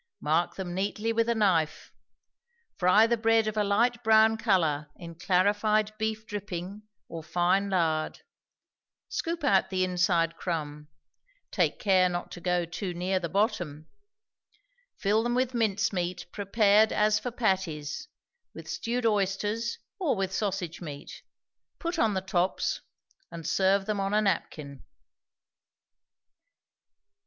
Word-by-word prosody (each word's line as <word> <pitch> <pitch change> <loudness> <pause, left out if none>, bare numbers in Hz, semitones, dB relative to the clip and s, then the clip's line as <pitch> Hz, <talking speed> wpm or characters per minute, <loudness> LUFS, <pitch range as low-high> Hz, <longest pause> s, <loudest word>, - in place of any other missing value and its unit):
Mark 160 +3 0
them 180 -2 -5
neatly 205 +4 -1
with 230 +1 +1
a 235 - +2
knife; 180 -8 0 0.8
fry 190 +5 +5
the 235 +1 +1
bread 225 0 +3
of 215 0 -2
a 210 - +2
light 235 +4 +1
brown 220 0 +5
color 165 -10 +1
in 170 -2 -10
clarified 205 +5 +1
beef 220 0 -2
dripping 200 -1 -6 0.3
or 165 - -7
fine 175 +5 +1
lard; 160 -4 0 0.9
scoop 335 -1 -3
out 280 - +3
the 185 -1 0
inside 175 -2 +1
crumb; 150 -4 -4 0.6
take - - +1
care 185 -3 +3
not 175 0 -4
to 175 - -9
go 180 0 0
too 175 +2 -5
near 185 +2 0
the 170 -2 -4
bottom; 175 - -1 1.1
fill 210 +2 +2
them 240 +1 -1
with 255 0 0
mince 215 -2 +1
meat 175 -1 -3
prepared 210 +1 +3
as 210 0 +2
for 245 - -4
patties, 190 - -2 0.5
with - - -10
stewed 240 +1 -2
oysters 210 +2 0 0.2
or 325 -10 +1
with 190 -1 -2
sausage 190 -6 -3
meat; 145 -4 -8 0.6
put 340 0 -3
on 220 -3 +2
the 190 - 0
tops, 185 0 -1 0.5
and 170 -1 -9
serve 195 +1 +2
them 210 -1 -2
on 195 +1 0
a 215 - +4
napkin. 150 -7 -3
195 Hz, 135 wpm, -28 LUFS, 175-220 Hz, 1.1 s, fry